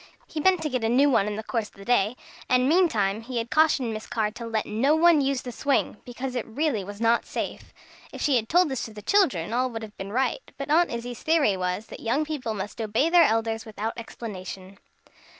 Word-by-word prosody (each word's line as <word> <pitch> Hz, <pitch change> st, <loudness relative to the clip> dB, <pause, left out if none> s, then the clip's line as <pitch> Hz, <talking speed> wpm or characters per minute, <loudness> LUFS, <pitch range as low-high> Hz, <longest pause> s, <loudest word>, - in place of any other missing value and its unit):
He 315 Hz, -, -6 dB
meant 365 Hz, +1 st, +3 dB
to 305 Hz, -, -1 dB
get 255 Hz, -4 st, -2 dB
a 225 Hz, -, +1 dB
new 275 Hz, +4 st, +4 dB
one 210 Hz, -5 st, +3 dB
in 210 Hz, -, -2 dB
the 220 Hz, -, -5 dB
course 225 Hz, -2 st, -2 dB
of -, -, -28 dB
the 195 Hz, 0 st, -12 dB
day, 240 Hz, -1 st, +2 dB, 0.3 s
and, 250 Hz, 0 st, +3 dB
meantime, 225 Hz, -, +2 dB
he 240 Hz, +2 st, -6 dB
had 230 Hz, 0 st, -3 dB
cautioned 290 Hz, -7 st, +3 dB
Miss 215 Hz, 0 st, -6 dB
Carr 215 Hz, -2 st, -1 dB
to 235 Hz, +1 st, -7 dB
let 220 Hz, -1 st, -1 dB
no 255 Hz, +8 st, +2 dB
one 330 Hz, -2 st, +5 dB
use 270 Hz, -1 st, 0 dB
the 250 Hz, -, -6 dB
swing, 280 Hz, +3 st, 0 dB
because 250 Hz, +1 st, -5 dB
it 245 Hz, -3 st, -3 dB
really 235 Hz, -2 st, -1 dB
was 205 Hz, +2 st, -9 dB
not 230 Hz, +1 st, +3 dB
safe. -, -, -5 dB, 0.4 s
If -, -, -9 dB
she 285 Hz, -, +2 dB
had 225 Hz, -2 st, 0 dB
told 350 Hz, 0 st, +4 dB
this 265 Hz, -3 st, -3 dB
to 220 Hz, -, -10 dB
the 210 Hz, -, -9 dB
children, 245 Hz, -, +2 dB
all 255 Hz, +1 st, +1 dB
would 225 Hz, -2 st, -6 dB
have 215 Hz, -1 st, -10 dB
been 195 Hz, +1 st, -6 dB
right; 265 Hz, -, 0 dB, 0.2 s
but 280 Hz, +1 st, -4 dB
Aunt 340 Hz, +3 st, +4 dB
Izzie's 240 Hz, 0 st, -5 dB
theory 310 Hz, -11 st, +3 dB
was, 180 Hz, +3 st, -2 dB
that -, -, -10 dB
young 275 Hz, +7 st, 0 dB
people 270 Hz, -8 st, -3 dB
must 205 Hz, +3 st, -5 dB
obey 225 Hz, +9 st, +1 dB
their 345 Hz, -1 st, +7 dB
elders 225 Hz, 0 st, 0 dB
without 220 Hz, 0 st, -4 dB
explanation. 195 Hz, -4 st, -8 dB
235 Hz, 235 wpm, -26 LUFS, 215-280 Hz, 0.4 s, their